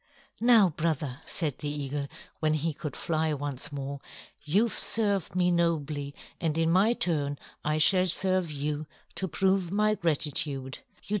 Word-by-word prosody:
"Now, 230 Hz, -5 st, +6 dB
brother," 150 Hz, -4 st, -2 dB
said 150 Hz, -6 st, -3 dB
the 150 Hz, -, -3 dB
eagle, 145 Hz, -1 st, -3 dB, 0.3 s
when 155 Hz, -1 st, +2 dB
he 155 Hz, +1 st, -1 dB
could 145 Hz, -1 st, -6 dB
fly 160 Hz, -1 st, 0 dB
once 140 Hz, -1 st, -3 dB
more, 140 Hz, 0 st, -5 dB, 0.4 s
"you've 205 Hz, +10 st, +2 dB
served 200 Hz, -5 st, +1 dB
me 180 Hz, -1 st, +3 dB
nobly, 150 Hz, -4 st, 0 dB, 0.2 s
and 160 Hz, -2 st, 0 dB
in 165 Hz, 0 st, +2 dB
my 200 Hz, +6 st, +4 dB
turn 145 Hz, -9 st, -1 dB, 0.3 s
I 155 Hz, +1 st, 0 dB
shall 185 Hz, +4 st, +5 dB
serve 185 Hz, -1 st, +1 dB
you 150 Hz, +1 st, -3 dB, 0.3 s
to 190 Hz, -, -2 dB
prove 190 Hz, 0 st, +1 dB
my 210 Hz, +1 st, +3 dB
gratitude. 145 Hz, -6 st, -1 dB
155 Hz, 145 wpm, -28 LUFS, 145-185 Hz, 0.4 s, Now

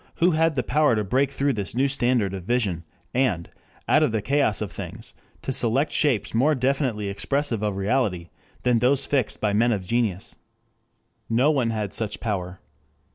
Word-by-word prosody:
Who 175 Hz, +2 st, +3 dB
had 160 Hz, -1 st, +2 dB
the 130 Hz, -, 0 dB
power 150 Hz, -5 st, +2 dB
to 105 Hz, -, 0 dB
break 130 Hz, +7 st, +1 dB
through 140 Hz, 0 st, 0 dB
this 100 Hz, -1 st, -4 dB
new 135 Hz, +3 st, +3 dB
standard 120 Hz, -7 st, +1 dB
of 95 Hz, -2 st, -5 dB
vision 100 Hz, -6 st, -1 dB, 0.3 s
and, 120 Hz, -10 st, +1 dB, 0.4 s
out -, -, +4 dB
of -, -, +2 dB
the 110 Hz, -1 st, -1 dB
chaos 140 Hz, -3 st, +1 dB
of 105 Hz, -4 st, -4 dB
things, -, -, -8 dB, 0.3 s
to 135 Hz, -, -2 dB
select 130 Hz, +6 st, +1 dB
shapes 120 Hz, -9 st, +1 dB
more 140 Hz, +7 st, +3 dB
definitely 130 Hz, -5 st, 0 dB
expressive 120 Hz, +4 st, -1 dB
of 105 Hz, -2 st, -1 dB
reality 100 Hz, -4 st, -1 dB, 0.3 s
than 125 Hz, -2 st, +3 dB
those 130 Hz, +3 st, +2 dB
fixed 135 Hz, -6 st, -1 dB
by 105 Hz, -1 st, 0 dB
men 115 Hz, +3 st, +3 dB
of 100 Hz, -4 st, -2 dB
genius? 110 Hz, -3 st, -1 dB, 0.9 s
No 125 Hz, +6 st, +3 dB
one 130 Hz, -6 st, +1 dB
had 105 Hz, -3 st, -3 dB
such 105 Hz, -3 st, -2 dB
power. 95 Hz, -4 st, -3 dB
115 Hz, 180 wpm, -24 LUFS, 105-135 Hz, 0.9 s, out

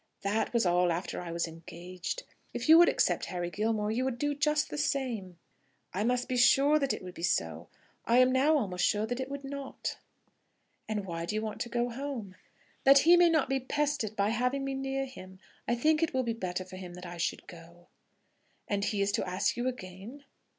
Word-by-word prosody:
"That 205 Hz, +3 st, 0 dB
was 235 Hz, -4 st, +2 dB
all 175 Hz, 0 st, +3 dB
after 170 Hz, +2 st, -3 dB
I 175 Hz, -1 st, -6 dB
was 170 Hz, 0 st, -1 dB
engaged. 175 Hz, -, -7 dB, 0.3 s
If -, -, -3 dB
you 320 Hz, +1 st, +9 dB
would 345 Hz, -, +7 dB
accept -, -, +1 dB
Harry 175 Hz, -1 st, -4 dB
Gilmore, 215 Hz, +1 st, 0 dB
you 240 Hz, +4 st, 0 dB
would 260 Hz, -2 st, -2 dB
do 290 Hz, +3 st, 0 dB
just 300 Hz, +1 st, +1 dB
the -, -, -4 dB
same." 235 Hz, -12 st, -2 dB, 0.6 s
"I 200 Hz, -, -1 dB
must 245 Hz, +2 st, 0 dB
be 255 Hz, -, -1 dB
sure 275 Hz, +5 st, +5 dB
that 275 Hz, -2 st, 0 dB
it -, -, -4 dB
would 180 Hz, -1 st, -8 dB
be -, -, -10 dB
so. 175 Hz, -, -1 dB, 0.4 s
I 235 Hz, -, +3 dB
am 255 Hz, 0 st, +6 dB
now 285 Hz, +4 st, +4 dB
almost 185 Hz, -9 st, -2 dB
sure 210 Hz, +1 st, +2 dB
that 245 Hz, +3 st, -4 dB
it 260 Hz, 0 st, -3 dB
would 280 Hz, 0 st, -6 dB
not." 275 Hz, 0 st, -5 dB, 0.9 s
"And 210 Hz, -2 st, -2 dB
why 170 Hz, -2 st, -4 dB
do 210 Hz, -, -2 dB
you 215 Hz, -, -1 dB
want 215 Hz, -1 st, -5 dB
to 240 Hz, -, -3 dB
go 240 Hz, +1 st, 0 dB
home?" 245 Hz, -6 st, -5 dB, 0.5 s
"That 275 Hz, +1 st, +8 dB
he 345 Hz, +1 st, +8 dB
may 350 Hz, -1 st, +6 dB
not 315 Hz, -4 st, +2 dB
be 270 Hz, 0 st, 0 dB
pestered 280 Hz, -5 st, -1 dB
by 200 Hz, 0 st, +1 dB
having 250 Hz, +4 st, 0 dB
me 275 Hz, -, -2 dB
near 270 Hz, 0 st, -2 dB
him. 190 Hz, -8 st, -11 dB, 0.3 s
I 235 Hz, -, +2 dB
think 305 Hz, +6 st, +2 dB
it 325 Hz, -4 st, 0 dB
will 260 Hz, -, +2 dB
be 235 Hz, -1 st, -1 dB
better 185 Hz, -4 st, -4 dB
for 185 Hz, 0 st, -10 dB
him 180 Hz, -2 st, -8 dB
that 180 Hz, 0 st, -9 dB
I 175 Hz, 0 st, -7 dB
should 165 Hz, -, -2 dB
go." 170 Hz, 0 st, -14 dB, 0.8 s
"And 200 Hz, -1 st, -1 dB
he 200 Hz, -2 st, 0 dB
is 200 Hz, -, 0 dB
to -, -, -1 dB
ask 185 Hz, +1 st, 0 dB
you 240 Hz, +2 st, -2 dB
again?" 225 Hz, +3 st, -7 dB
230 Hz, 220 wpm, -30 LUFS, 185-270 Hz, 0.9 s, you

